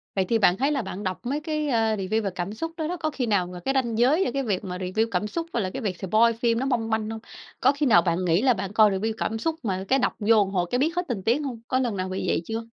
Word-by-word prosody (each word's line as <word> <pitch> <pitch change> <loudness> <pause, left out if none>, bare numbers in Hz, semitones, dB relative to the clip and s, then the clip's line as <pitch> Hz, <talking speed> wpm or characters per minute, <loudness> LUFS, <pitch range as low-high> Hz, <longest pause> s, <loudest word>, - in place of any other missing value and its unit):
Vậy 190 - +1
thì 225 +4 +2
bạn 185 -2 +4
thấy 275 +4 +1
là 275 -4 0
bạn 195 0 -6
đọc 185 -3 -3
mấy 280 +5 -1
cái, 305 -1 -2
a, 225 -4 +2
review 215 +3 -1
về 195 - 0
cảm 180 +3 -3
xúc 330 +8 -4
đó 315 -2 -2
đó, 360 - -3
có 310 -2 -1
khi 270 -4 -2
nào 200 -5 +1
mà 180 0 -8
cái 270 +10 -1
ranh 240 -4 0
giới 280 +10 +4
giữa - - -1
cái 275 0 -1
việc 205 -5 -1
mà 180 -2 -5
review 190 +5 -1
cảm 185 +3 0
xúc 330 +9 -4
với 235 - +1
lại 185 -2 -2
cái 270 - -5
việc 190 -5 -2
spoil 220 +5 +3
phim 230 -1 +2
nó 265 - -1
mong 235 -4 0
manh 220 -1 -1
hông? 225 - -5 0.4
Có - - +5
khi 285 +1 -1
nào 195 -9 +6
bạn 170 +1 0
nghĩ 170 +2 +3
là 255 -1 +4
bạn 195 -1 -5
coi 215 -1 +5
review 210 +4 -1
cảm 225 - -2
xúc 320 +8 -1
mà 190 -4 -2
cái 270 - +3
đọc - - 0
vô 220 +1 +4
một - - -6
hồi 180 -2 0
cái 245 - +1
biết 325 +5 +1
hết 355 - -1
tình 210 -7 -3
tiết 235 +5 +3
hông? 260 -6 -5
Có 255 - +1
lần 235 -6 -1
nào 185 0 -2
bị 185 0 -3
vậy - - +1
chưa? 225 +1 -3
225 Hz, 325 wpm, -25 LUFS, 190-265 Hz, 0.4 s, nào